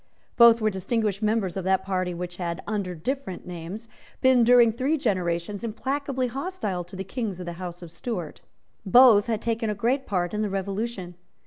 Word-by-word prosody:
Both 235 -1 +7
were 215 0 +2
distinguished 200 +1 -1
members 215 -4 0
of 190 - -3
that 190 0 +2
party 185 -2 -1
which 175 0 -6
had, 170 -1 -4
under 200 -4 -3
different 220 - -4
names, 180 +6 -7 0.3
been, 260 -2 +5
during 240 -1 +6
three 265 +8 0
generations, 185 - -1
implacably 265 +3 -2
hostile 250 - -3
to 180 +3 -11
the 190 - -4
Kings 200 -2 -4
of 180 - -6
the 175 - -5
House 175 -1 -7
of 165 - -10
Stuart. 175 -4 -5 0.4
Both 220 0 +6
had 225 -2 -2
taken 225 -1 -1
a 210 - -1
great 250 +6 0
part 180 -2 -1
in 210 - -1
the 210 - 0
Revolution. 195 -1 -3
205 Hz, 185 wpm, -25 LUFS, 180-235 Hz, 0.4 s, Both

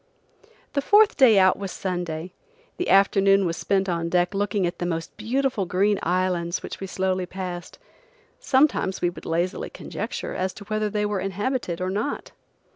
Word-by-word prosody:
The 280 - +1
fourth 415 +7 +5
day 240 -6 +6
out 190 0 +5
was 195 -2 -4
Sunday. 175 -2 -4 0.4
The 360 - -2
afternoon 195 0 +5
was 165 -1 -1
spent 195 +2 0
on 170 -2 -1
deck 175 +2 +1
looking 200 -1 0
at 175 - -3
the 175 - -2
most 165 -2 -4
beautiful 245 -2 -1
green 195 +3 +2
islands 180 -1 0
which - - -7
we 195 - -5
slowly 185 -1 -1
passed. 180 -1 -6 0.6
Sometimes 270 - +2
we 175 - +2
would - - -11
lazily 175 +3 -1
conjecture - - -5
as 185 0 -2
to 205 - -10
whether 215 +1 -1
they 210 0 -1
were 205 -1 -1
inhabited 195 -1 -2
or 185 0 -1
not. 210 +9 -3
190 Hz, 170 wpm, -24 LUFS, 180-210 Hz, 0.6 s, day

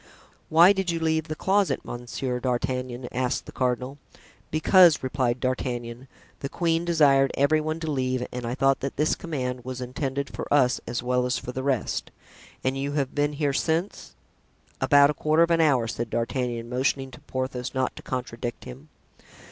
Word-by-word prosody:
"Why 170 +5 +7
did 190 -2 -2
you 165 -1 0
leave 160 0 0
the 155 - -4
closet, 195 +3 +1
Monsieur 125 +1 -4
d'Artagnan?" 125 0 -2
asked 125 0 -1
the - - -10
cardinal. 125 +2 -2 0.5
"Because," 165 +1 +5
replied 130 -2 0
D'Artagnan, 125 -1 -3 0.3
"the 140 - -4
queen 165 +1 0
desired 140 -5 +4
every 155 +3 +3
one 155 +1 -3
to 160 -1 -2
leave 130 -2 -1
and 125 0 -5
I 120 +1 -3
thought 135 0 +2
that 135 - -4
this 150 +2 +2
command 130 -8 -4
was 130 0 -6
intended 135 +2 -3
for - - -7
us 130 -4 +3
as 120 +1 -3
well 125 0 +1
as 125 - 0
for 125 - -6
the 130 - -4
rest." 135 -3 -1 0.5
"And 130 +1 0
you 140 +1 -3
have 140 -3 -1
been 145 0 0
here 145 -1 0
since——" 165 +6 -2 0.7
"About 145 0 +6
a - - -4
quarter 155 +3 +3
of 170 - +1
an 165 0 +4
hour," 135 -7 +3
said 115 0 -4
D'Artagnan, 120 0 -2
motioning 130 +2 -1
to 125 - -12
Porthos 130 -2 -4
not 130 -1 0
to - - -9
contradict 120 -2 -5
him. 135 +5 -11
135 Hz, 180 wpm, -25 LUFS, 125-155 Hz, 0.7 s, Why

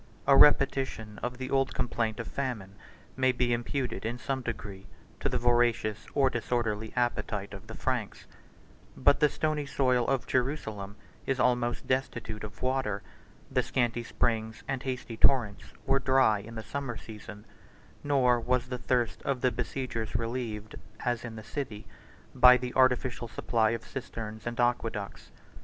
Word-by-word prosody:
A 140 - +6
repetition 135 -7 +4
of 125 0 -3
the 130 0 -5
old 135 -1 +1
complaint 115 -3 -1
of 115 - -4
famine 120 -8 -4 0.4
may 130 0 +3
be 125 -1 +1
imputed 120 -2 -2
in 115 +2 -2
some 130 +2 -2
degree 100 -4 -6 0.3
to - - 0
the - - 0
voracious 120 -3 +2
or 140 -2 +5
disorderly 110 -2 -1
appetite 105 -4 -1
of 95 - -10
the - - -8
Franks; - - -2 0.7
but 140 - +4
the 150 -1 +5
stony 155 -2 -1
soil 125 -3 +2
of 135 -3 +1
Jerusalem 110 -7 -2 0.3
is 135 -1 0
almost 120 -1 +1
destitute 115 -5 -2
of 105 +2 -8
water; 130 -6 0 0.5
the - - +3
scanty 120 -2 0
springs 110 -1 -1
and 135 -2 -2
hasty 125 -3 -4
torrents 115 -7 +3 0.2
were 135 0 +3
dry 130 -5 +4
in 115 +3 -10
the 110 - -5
summer 120 +1 -4
season; 105 -1 -10 0.6
nor 130 -4 +3
was 125 +1 0
the 125 -1 -3
thirst 120 -2 0
of 135 -3 -1
the 125 - +3
besiegers 120 -2 -3
relieved, 115 -2 -3 0.3
as 120 -1 -1
in 115 -2 -6
the 110 - -8
city, 110 -2 -5 0.5
by 125 -1 +8
the 125 0 -5
artificial 130 -1 +2
supply 115 -1 +1
of 115 0 -3
cisterns 110 -4 -6
and 120 +1 -4
aqueducts. 115 -4 -1
120 Hz, 155 wpm, -29 LUFS, 110-130 Hz, 0.7 s, by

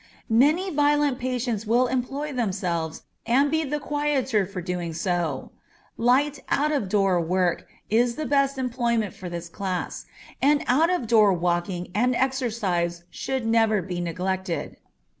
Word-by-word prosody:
Many 305 +11 +3
violent 290 -3 +2
patients 245 -4 -2
will 240 +3 +4
employ 270 +4 -2
themselves 180 -9 -2 0.2
and 275 +4 +3
be 320 0 +1
the 295 0 -2
quieter 280 -8 0
for 195 -1 -6
so 175 - -8
doing. 175 -4 -2 0.5
Light 270 +4 +2
out 300 +2 +2
of 270 -11 -1
door 195 -3 +2
work 180 +1 0 0.2
is 235 +2 +2
the 310 - -3
best 275 -1 +2
employment 235 -5 0
for 180 - -8
this 170 0 -5
class, 185 +1 -4 0.4
and 290 +1 +3
out 310 +7 +3
of 360 -9 0
door 215 -3 +5
walking 175 +1 -1
and 245 +4 +2
exercise 215 -10 -1
should 265 -3 -3
never 225 -2 +3
be 175 -1 -4
neglected. 185 +1 -3
230 Hz, 140 wpm, -25 LUFS, 180-270 Hz, 0.5 s, door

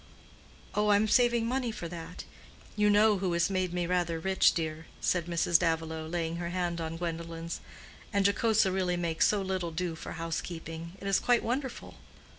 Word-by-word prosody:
"Oh, 210 0 +1
I 205 - +6
am 210 +2 +3
saving 240 0 +3
money 250 0 -1
for 175 -6 -6
that. 165 -1 -8 0.5
You 210 0 +3
know 210 0 +5
who 185 -2 0
has 170 +3 +2
made 185 -2 0
me 175 0 -1
rather 175 -2 0
rich, 190 +3 +3
dear," 160 -1 -3
said 175 -2 0
Mrs. 170 -1 +3
Davilow, 160 -2 -1
laying 165 0 -2
her 170 0 -3
hand 175 -1 -2
on 160 0 -4
Gwendolen's. 165 0 -4 0.5
"And 200 -1 +1
Jocosa 210 0 +3
really 185 -2 0
makes 170 -2 +2
so 205 -2 +1
little 185 -2 -2
do 170 +1 -2
for 160 - -7
housekeeping—it 165 +2 -5
is 195 -1 +3
quite 245 -1 +2
wonderful." 260 +2 -3
175 Hz, 175 wpm, -30 LUFS, 165-200 Hz, 0.5 s, I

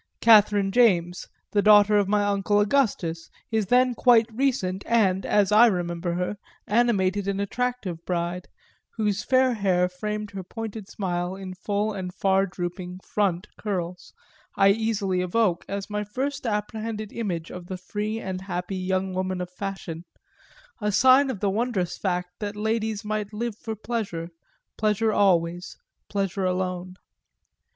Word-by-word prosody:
Catherine 210 -3 +5
James, 180 -7 +2 0.3
daughter 210 0 +6
of 205 -2 +3
my 205 +1 +2
uncle 205 0 +1
Augustus, 200 -8 0 0.2
his 220 -3 0
then 250 +2 +4
quite 235 -2 +5
recent 220 -7 0
and, 195 -5 +2
as 205 -2 +3
I 220 +3 +8
remember 175 -3 -1
her, 180 +3 -2 0.3
animated 205 -4 +1
and 200 0 -1
attractive 200 -5 -3
bride, 175 0 -2 0.5
whose 210 -2 0
fair 260 -1 +3
hair 185 -4 +2
framed 210 +3 -4
her 195 -1 -6
pointed 220 +1 -7
smile 180 -2 -2
in 190 -1 -7
full 205 +3 -2
and 185 -2 -5
far 195 +1 +2
drooping 180 0 -6
"front" 190 -3 0
curls, 180 -4 -4 0.4
I 195 - +5
easily 200 -3 +1
evoke 180 -1 +1
as 200 0 -4
my 210 0 -2
first 265 +5 -3
apprehended 215 0 -3
image 180 -8 -3
of 180 -1 -8
the 185 - -5
free 210 +4 -4
and 185 -3 -5
happy 185 0 -4
young 185 0 -1
woman 185 0 -2
of 180 0 -5
fashion, 180 -3 -6 0.8
a 210 0 +1
sign 260 +6 +5
of 230 -8 -4
the 205 - +2
wondrous 205 -5 -1
fact 180 -2 -3
that 205 -1 -4
ladies 220 0 -1
might 210 -1 -2
live 230 0 -3
for 225 0 -6
pleasure, 205 -7 -4 0.5
pleasure 215 0 +2
always, 175 -3 +1 0.3
pleasure 195 -1 -1
alone. 185 0 -2
200 Hz, 145 wpm, -25 LUFS, 185-215 Hz, 0.8 s, I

